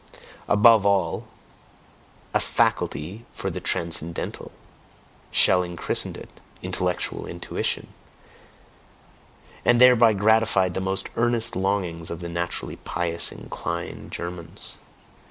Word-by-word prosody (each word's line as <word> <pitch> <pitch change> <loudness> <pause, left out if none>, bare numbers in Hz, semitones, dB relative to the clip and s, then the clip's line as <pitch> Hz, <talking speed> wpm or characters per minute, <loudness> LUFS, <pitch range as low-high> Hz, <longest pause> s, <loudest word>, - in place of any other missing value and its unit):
Above 110 0 +6
all 100 -4 +1 1.1
a - - +3
faculty 95 +10 -1
for - - -4
the - - -5
"transcendental"; 85 0 -1 0.8
Schelling 90 -2 +4
christened - - -1
it, - - -9 0.4
intellectual 90 -1 -2
intuition, 85 0 -3 1.7
and 120 - +4
thereby 120 -3 +7
gratified 105 -3 +3
the 95 - -2
most 95 +1 -2
earnest 120 -1 +1
longings 95 -4 -1
of 85 - -5
the 85 -1 -6
naturally 85 +1 -3
pious 85 -1 0
inclined - - -6
Germans. 85 -1 -5
95 Hz, 100 wpm, -24 LUFS, 85-110 Hz, 1.7 s, thereby